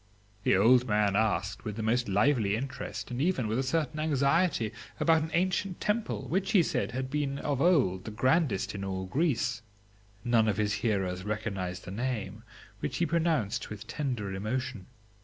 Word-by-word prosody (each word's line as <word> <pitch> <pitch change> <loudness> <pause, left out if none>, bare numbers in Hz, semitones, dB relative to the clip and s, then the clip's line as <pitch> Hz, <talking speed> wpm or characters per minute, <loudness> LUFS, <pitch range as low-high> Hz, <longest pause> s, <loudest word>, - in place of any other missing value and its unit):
"The 95 - +3
old 125 +5 +5
man 105 -2 +2
asked, 105 -2 0
with 105 -2 -4
the 110 - -4
most 120 +1 +1
lively 105 0 +3
interest, 130 +1 -5
and 125 +2 -2
even 150 -8 +1
with 110 +4 0
a - - +3
certain 150 +1 -1
anxiety, 150 - +2 0.3
about 160 -1 +4
an 160 - -3
ancient 185 +2 0
temple, 215 +2 -1
which, 190 +2 0
he 190 -5 +6
said, - - -1
had 130 +1 -3
been 145 -2 -1
of 140 -2 -2
old 130 - +3
the - - -4
grandest 130 - +1
in 100 -1 -5
all 95 -1 -3
Greece. 125 - 0 0.6
None 115 -2 +3
of 105 -3 +1
his 105 -1 +1
hearers 95 -5 0
recognised 100 -4 -3
the 95 - -7
name,, 120 +1 -3 0.4
which - - -3
he - - +2
pronounced 155 -9 0
with 105 -1 -8
tender 115 -5 -3
emotion. 110 +1 -3
120 Hz, 175 wpm, -29 LUFS, 105-145 Hz, 0.6 s, he